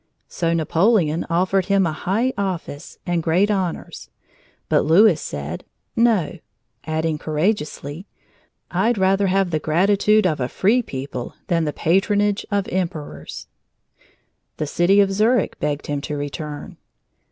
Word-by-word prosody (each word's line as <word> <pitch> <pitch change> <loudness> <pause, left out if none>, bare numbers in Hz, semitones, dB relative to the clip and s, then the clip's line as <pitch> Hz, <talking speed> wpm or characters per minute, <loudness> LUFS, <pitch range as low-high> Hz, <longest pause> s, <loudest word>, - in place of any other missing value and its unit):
So 165 -1 -1
Napoleon 165 0 +2
offered 185 +2 +1
him 200 -2 +3
a 165 - 0
high 215 +11 -1
office 185 -7 -4
and 175 -2 0
great 180 +6 +2
honors; 185 -4 -3 0.6
but - - +3
Louis 170 +2 +5
said 75 +3 -5 0.3
"No," 225 -8 +2 0.5
adding 160 -1 -1
courageously: 155 0 -2 0.6
"I'd 235 -1 +1
rather 195 +1 +2
have 190 -1 +1
the 155 - 0
gratitude 200 +7 +3
of 155 -5 +1
a 125 0 -1
free 225 +6 +2
people 130 - -6
than 165 -2 +2
the 150 - -1
patronage 205 +5 +1
of 200 -1 0
Emperors!" 160 - -4 1.1
The 155 - -2
city 175 +7 +3
of 195 -1 +2
Zurich 220 +5 +1
begged 145 -1 -2
him 145 -1 -2
to 150 0 -4
return. 145 +1 -6
175 Hz, 130 wpm, -21 LUFS, 155-200 Hz, 1.1 s, Louis